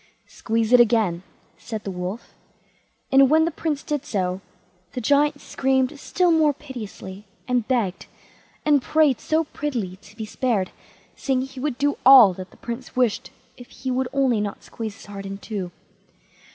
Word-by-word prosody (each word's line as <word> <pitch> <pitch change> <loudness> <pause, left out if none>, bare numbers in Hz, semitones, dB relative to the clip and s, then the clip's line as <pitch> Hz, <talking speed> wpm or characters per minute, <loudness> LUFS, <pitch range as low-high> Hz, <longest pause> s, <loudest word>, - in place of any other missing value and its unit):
"Squeeze 225 +1 -1
it 250 - +8
again", 220 -7 +3 0.4
said 220 -3 -6
the 195 - -4
Wolf; 180 +5 -6 0.8
and 270 -1 +6
when 315 +2 +5
the 335 - -1
Prince 300 -2 -3
did 295 -3 -2
so, 185 -3 -2 0.5
the - - -3
Giant 285 +4 +2
screamed 265 0 0
still 355 +3 +1
more 310 -2 +4
piteously, 210 -8 -9 0.2
and 250 -3 0
begged 225 -8 -1 0.6
and 295 -2 +4
prayed 300 -3 +2
so 315 +1 +1
prettily 240 - -4
to 205 +1 -18
be 220 - -4
spared, 215 -4 -1 0.4
saying 265 -2 0
he 265 0 -9
would 275 -2 -2
do 285 +1 0
all 250 -8 +9
that 185 +1 -9
the - - -20
Prince 235 +2 -7
wished 250 -4 +1 0.3
if 245 -1 -12
he 260 - -5
would 255 0 0
only 260 -6 +2
not 205 -1 -5
squeeze 220 -3 -6
his - - -14
heart 195 -1 -8
in 195 0 -6
two. 200 -3 -5
245 Hz, 165 wpm, -23 LUFS, 205-275 Hz, 0.8 s, all